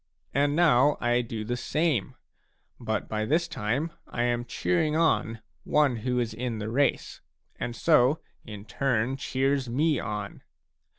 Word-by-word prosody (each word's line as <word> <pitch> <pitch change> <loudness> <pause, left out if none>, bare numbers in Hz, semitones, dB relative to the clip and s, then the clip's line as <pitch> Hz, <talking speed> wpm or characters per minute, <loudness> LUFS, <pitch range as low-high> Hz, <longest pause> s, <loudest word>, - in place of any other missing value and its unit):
And 145 +2 +2
now 150 -4 +4
I 120 0 +2
do 115 -2 -5
the 120 +3 -2
same; 150 - -1 0.6
but - - -2
by 110 0 -2
this 160 +9 +1
time 140 +4 -2 0.2
I 120 - -2
am 120 0 0
cheering 155 +5 0
on 115 -9 +1 0.2
one 145 -5 +2
who 125 +3 -2
is 115 -2 -1
in 120 0 -3
the 110 +1 -4
race 140 +4 0 0.4
and 120 - -4
so 150 0 +4 0.2
in 105 -1 -9
turn 125 0 0
cheers 135 -1 -1
me 150 +4 +1
on. 105 -1 -5
125 Hz, 145 wpm, -27 LUFS, 115-150 Hz, 0.6 s, now